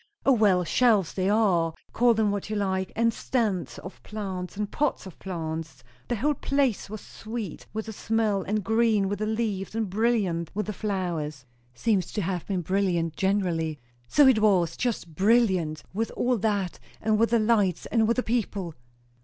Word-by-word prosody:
"O, 275 - +6
well! 205 -7 +4
shelves 210 -1 +3
they 190 0 0
are, 180 -7 +2 0.2
call 240 0 +4
them 215 -2 +2
what 205 0 -3
you 215 - -2
like; 190 -2 -1
and 230 0 +2
stands 215 -9 -1
of 185 - -10
plants 195 -3 -5
and 210 -1 -3
pots 295 -7 -1
of 190 - -11
plants 160 -3 -5 0.2
the 240 - 0
whole 290 +7 +1
place 275 -7 0
was 215 0 -6
sweet 220 -5 -7
with 220 0 -4
the 220 - -6
smell, 215 -2 0
and 210 +2 -1
green 220 -2 +2
with 200 0 -3
the 215 - -1
leaves, 215 -3 -2
and 220 -4 -1
brilliant 200 -6 +1
with 210 - -1
the 210 - -4
flowers 175 - -3 0.2
" - - -37
"Seems 190 - 0
to 210 - -1
have 175 -1 -3
been 190 -3 -1
brilliant 175 -3 0
generally." 175 -5 0 0.3
"So 290 - +5
it 260 -4 +6
was, 185 -6 +3
just 220 -9 -2
brilliant, 190 -6 +2
with 225 +3 -1
all 245 -2 +1
that, 200 -4 -1 0.2
and 215 0 +1
with 230 - +3
the 235 - +4
lights, 215 -5 +2
and 225 -2 +2
with 235 - +1
the 250 - +1
people." 205 -7 -2
205 Hz, 185 wpm, -26 LUFS, 180-225 Hz, 0.3 s, O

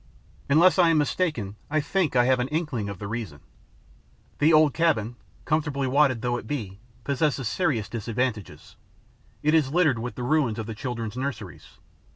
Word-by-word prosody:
Unless 165 +5 +5
I 175 -2 +6
am 165 - +3
mistaken, 145 - -1
I 155 +1 +1
think 165 -1 -1
I 120 -1 +4
have 130 0 +3
an 125 - 0
inkling 150 -9 -2
of 100 - -6
the 100 - -6
reason. 105 -10 -5 1.0
The 155 +3 +4
old 155 -3 +5
cabin, 130 -9 +1 0.3
comfortably 150 -3 0
wadded 130 -3 +2
though 120 0 0
it - - -9
be, 105 -10 -5 0.2
possesses 140 -2 0
serious 125 - 0
disadvantages: 115 -1 -4 0.7
it 155 +1 +2
is 155 -5 +3
littered 155 -8 +2
with 120 +2 -5
the 125 - -5
ruins 130 -4 +1
of 110 - -4
the 110 - -6
children's 115 -2 -5
nurseries. 135 +1 -6
130 Hz, 170 wpm, -25 LUFS, 115-155 Hz, 1.0 s, I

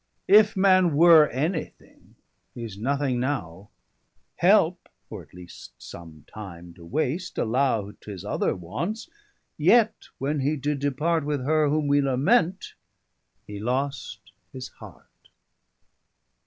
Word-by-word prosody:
170 210 +2 +7
If 220 - -14
man 185 -4 +4
were 160 -1 +7
any 155 +7 -2
thing, - - -24 0.4
he's 115 -4 -7
nothing 135 +3 -1
now: 100 - -4 0.7
Helpe, - - +3 0.2
or - - -7
at - - -19
least 90 -1 -13
some 80 -3 -12
time 85 -5 -11
to 85 - -16
wast, 155 - -3
allow 115 -4 0
T'his 100 -2 -10
other - - -1
wants, 140 - -5 0.5
yet 230 -2 +3
when 145 +2 -2
he 145 +3 0
did 145 0 -2
depart 150 +4 0
With 145 -3 -3
her 155 0 +2
whom 150 0 0
we 145 0 +3
lament, 165 - +1 0.7
hee 105 -1 -8
lost 130 +5 -4 0.2
his 130 -1 -8
heart. - - -17
140 Hz, 130 wpm, -25 LUFS, 105-155 Hz, 0.7 s, 170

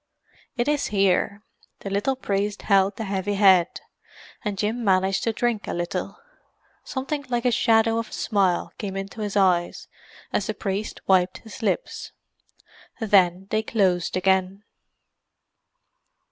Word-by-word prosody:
"It 240 - 0
is 295 -1 +1
here." 200 +1 +1 0.4
The 195 - -6
little 235 +7 0
priest 205 -4 -2
held 195 -1 +3
the 225 - -4
heavy 200 0 -2
head, 190 -3 +4 0.6
and 205 -2 -3
Jim 220 +4 -1
managed 190 -1 +2
to 230 - +2
drink 225 -1 -1
a - - -3
little. 175 - -3 0.7
Something 285 +2 -4
like 240 0 -1
a 245 - +4
shadow 225 0 +3
of 230 - -5
a - - -13
smile 190 -4 0
came 195 -2 -4
into 195 +3 -6
his 205 -1 -2
eyes 180 -3 +1 0.5
as - - 0
the - - -2
priest 200 +1 -4
wiped 185 -1 +3
his 225 +2 -11
lips. 225 - -2 0.9
Then 190 -4 +3
they 215 - +2
closed 190 -6 0
again. 190 +1 +1
200 Hz, 140 wpm, -24 LUFS, 190-225 Hz, 0.9 s, head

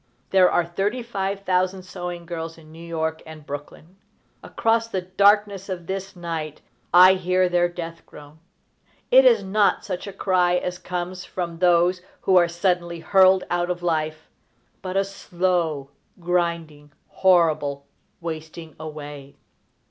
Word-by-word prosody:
_ - - -42 0.3
There 185 -1 +6
are 175 - +1
thirty 200 +8 -2
five 195 -3 -3
thousand 185 0 0
sewing 180 -2 -7
girls 165 -1 -6
in 155 -1 -16
New 165 +1 -12
York 160 -1 -3
and 155 -2 -12
Brooklyn. 150 +5 -9 0.4
Across 230 0 0
the 190 -5 -3
darkness 200 +1 +2
of 175 -2 -5
this 195 +2 -5
night 165 -3 -5 0.3
I 185 +2 +8
hear 185 0 +1
their 175 0 +2
death 170 -1 -7
groan. 150 +1 -14 0.7
It - - +7
is - - +5
not 200 +1 +1
such 185 0 -5
a - - -5
cry 185 -2 +1
as 180 0 -3
comes 180 0 -5
from 170 -2 -5
those 180 0 +3 0.2
who 190 - +2
are 175 -1 +6
suddenly 175 -1 -1
hurled 190 0 +5
out 175 0 0
of 175 -1 -3
life, 155 -2 -2 0.5
but 185 0 -3
a 195 - +3
slow, 175 -7 -2 0.3
grinding, 170 -4 -2 0.2
horrible 155 -6 +2 0.4
wasting 160 -1 -7
away. 145 -3 -9
175 Hz, 145 wpm, -23 LUFS, 165-185 Hz, 0.7 s, I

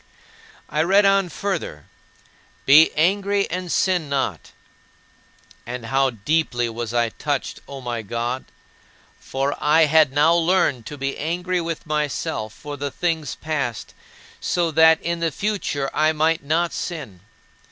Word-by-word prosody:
10. 150 - -1
I - - +5
read 195 +5 +4
on 195 -2 +3
further, 185 - -4 0.8
"Be 150 +4 +7
angry, 200 +5 +2
and 180 0 -3
sin 180 -6 +1
not." 140 -2 -2 1.1
And 120 -1 -6
how 135 +3 +2
deeply 120 +1 0
was 115 0 -5
I 120 -1 +1
touched, 145 +4 -3
O 140 -1 -8
my 120 -2 -3
God; 120 +4 -3 0.7
for 135 +2 -2
I 155 +2 +5
had 155 -2 +4
now 150 +4 +4
learned 165 -8 +1
to 150 - -7
be 135 0 -3
angry 175 +3 -1
with 165 -1 -5
myself 150 -8 -2
for 145 +5 -8
the 145 +1 -3
things 160 -2 -2
past, 135 -8 -4 0.5
so 170 -2 0
that 160 +1 +6
in 170 0 -2
the 165 0 +1
future 170 -9 -2
I 155 +1 +2
might 160 0 +1
not 165 +4 0
sin. 150 - -5
150 Hz, 140 wpm, -22 LUFS, 135-170 Hz, 1.1 s, Be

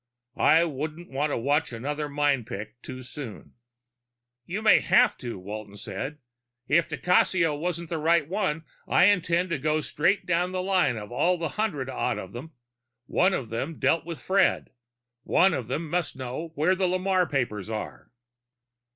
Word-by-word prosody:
I 160 +4 +5
wouldn't 155 +2 -5
want 145 +3 0
to - - 0
watch 145 +6 +1
another 145 +6 -3
mind 140 -5 +1
picking 110 -1 -6
too 130 0 -8
soon." 125 -3 -9 0.9
"You 195 +5 -3
may 220 - +7
have 250 +1 +4
to," 120 -5 -6
Walton 100 +2 -8
said. 135 +8 -5 0.5
"If 170 +3 +3
di 150 - -4
Cassio 180 -3 +3
wasn't 170 +1 -3
the 165 - -2
right 160 -1 +3
one, 170 -4 -1 0.2
I - - +4
intend 180 -2 +3
to 165 - 0
go 155 +2 +1
straight 180 +7 +1
down 180 +1 0
the 185 0 -1
line 180 -10 +2
on 105 -1 -7
all 175 +9 +1
hundred 165 -10 -2
odd 125 -1 -1
of 95 - -8
them. 145 +7 -8 0.5
One 185 +8 +2
of 120 -5 -4
them 135 +8 -4
dealt 165 - +2
with 165 -3 -6
Fred. 190 +7 +2 0.5
One 190 0 +3
of 125 -7 -3
them 155 +6 -3
must 170 -1 -1
know 130 +5 -5
where 160 +6 +3
the 185 0 +1
Lamarre 185 0 +1
papers 110 -7 -2
are." 110 -1 -6
155 Hz, 170 wpm, -26 LUFS, 130-180 Hz, 0.9 s, may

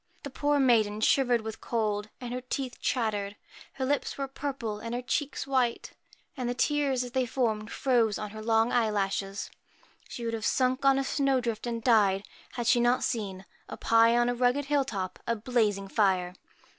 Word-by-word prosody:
The 280 - -6
poor 290 +2 +1
maiden 220 -5 +3
shivered 245 0 +3
with 220 -1 -7
cold, 210 -2 -1
and 245 -1 -6
her 250 - -3
teeth 255 0 -4
chattered. 210 -5 -1 0.4
Her 265 -1 -3
lips 285 +2 -1
were 275 -1 -2
purple 265 -6 -4
and 230 +2 -5
her 245 - -2
cheeks 290 +2 -2
74 275 - -7
white; 240 -2 -1 0.4
and 250 -2 -3
the 245 - -2
tears, 280 -2 +1
as 245 - -7
they 260 -1 0
formed, 225 -3 -1
froze 235 -5 +2
on 210 -1 -5
her 215 - -10
PRETTY 215 - -8
long 225 +1 +3
eyelashes. 200 -3 -1 0.6
She 235 - -6
would 230 - -2
have 225 -1 -4
sunk 255 +3 +1
on 270 0 +5
a 275 - +1
snow 275 -1 +1
drift 235 -1 -3
and 230 -1 -3
died, 205 -5 +3 0.3
had 240 -2 -3
she 245 +1 +4
not 240 +1 +2
seen, 195 -6 -3 0.2
up - - -9
high 230 +1 +5
on 240 0 +3
a 245 - +1
rugged 250 +3 +1
hill 285 -1 +1
top, 190 -7 -4
a 235 - +1
blazing 210 -4 0
fire. 190 -4 +1
235 Hz, 195 wpm, -28 LUFS, 215-260 Hz, 0.6 s, on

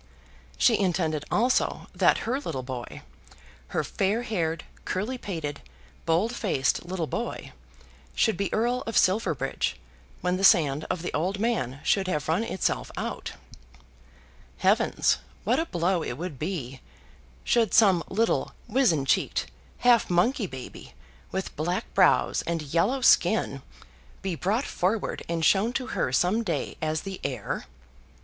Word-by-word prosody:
She 230 -3 +4
intended 165 -6 0
also 245 +4 +1
that - - +3
her 255 +4 0
little 135 - -4
boy, 125 -2 -7 0.6
her - - -1
fair 205 +5 0
haired, 165 -8 -2 0.2
curly 220 +7 -2
pated, 160 -9 -5 0.5
bold 180 +9 +2
faced 160 - 0
little 175 -1 -3
boy, 235 +9 -4 0.6
should 220 - +3
be 200 - -2
Earl 240 +3 +1
of 225 - -1
Silverbridge 185 - +1 0.5
when 180 0 0
the 195 - -3
sand 150 -5 +4
of 175 - -2
the - - -4
old 180 +6 0
man 195 - -1
should 195 -2 +2
have 150 -6 -1
run 165 +8 +1
itself 210 - -1
out. - - -4 1.2
Heavens, - - +2 0.2
what 240 +8 +2
a 330 - -1
blow 175 - +1
would 140 -4 -4
it 135 - -14
be, 140 -7 -4 0.6
should 230 -4 +2
some 190 -6 +5
little 225 +4 0
wizen 220 - +2
cheeked 65 - 0 0.3
half 245 -2 +4
monkey 195 +5 +2
baby, 130 -5 -10 0.4
with 190 - -4
black 175 +4 -2
brows, - - +4
and 165 -2 -1
yellow 250 +11 +2
skin, - - +3 0.6
be 190 -2 -1
brought 205 - 0
forward 195 +4 -1
and 165 -1 0
shown 210 +8 +3
to 255 - -2
her 125 - 0
some 180 - +2
day - - -2
as 155 0 -1
the 195 -1 -7
heir! 130 -7 -3
185 Hz, 140 wpm, -27 LUFS, 155-225 Hz, 1.2 s, some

